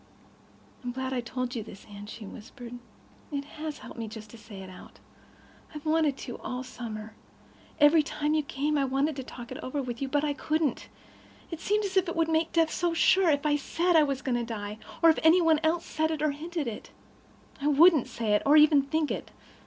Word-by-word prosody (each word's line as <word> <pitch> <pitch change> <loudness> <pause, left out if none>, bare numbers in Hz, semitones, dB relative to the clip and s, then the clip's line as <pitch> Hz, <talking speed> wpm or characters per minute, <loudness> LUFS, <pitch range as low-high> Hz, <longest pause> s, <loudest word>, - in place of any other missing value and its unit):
"I'm 245 0 -3
glad 260 +1 -3
I've 245 -2 -2
told 255 +1 -3
you 230 - -2
this, 205 -2 -11
Anne," 205 0 -10
she 215 0 -8
whispered. 245 +3 -10 0.5
"It 280 -1 -3
has 305 0 -6
helped - - -11
me 225 - -3
just 215 -1 -10
to 235 - -11
say 210 -3 -10
it - - -9
all - - -11
out. - - -15 0.8
I've 300 - -8
wanted 310 -3 +2
to 245 - -7
all 250 0 -4
summer—every 245 +6 -1
time 300 0 -1
you 310 - +3
came. 290 +1 -1
I - - +2
wanted 275 +3 0
to 265 - -4
talk 240 -1 -10
it 255 - -6
over 255 +3 -4
with 245 -2 -4
you—but 285 +2 0
I 295 -1 +1
couldn't. 305 -2 -1 0.6
It 330 - -5
seemed 420 +3 +1
as 385 -1 -2
if 375 -2 +3
it - - -4
would 330 -1 +1
make 320 +1 +1
death 330 -1 +2
so 345 -1 0
sure 375 +1 +4
if 285 -1 +1
I 295 -1 +3
said 340 +5 0
I 320 - +8
was 275 -3 -1
going 245 -2 0
to - - -2
die, 210 -2 -5 0.2
or 330 - +9
if - - -2
any 325 +3 +6
one 325 -3 +4
else 320 +2 +1
said 315 +1 0
it 310 -2 -2
or 305 - +3
hinted 320 +2 -4
it. 225 -3 -6 0.7
I 285 - 0
wouldn't 300 -1 +6
say 220 -3 -1
it, 210 - +3
or 290 +2 +6
even 300 -1 +7
think 300 +2 -1
it. - - -4
285 Hz, 225 wpm, -28 LUFS, 245-315 Hz, 0.8 s, or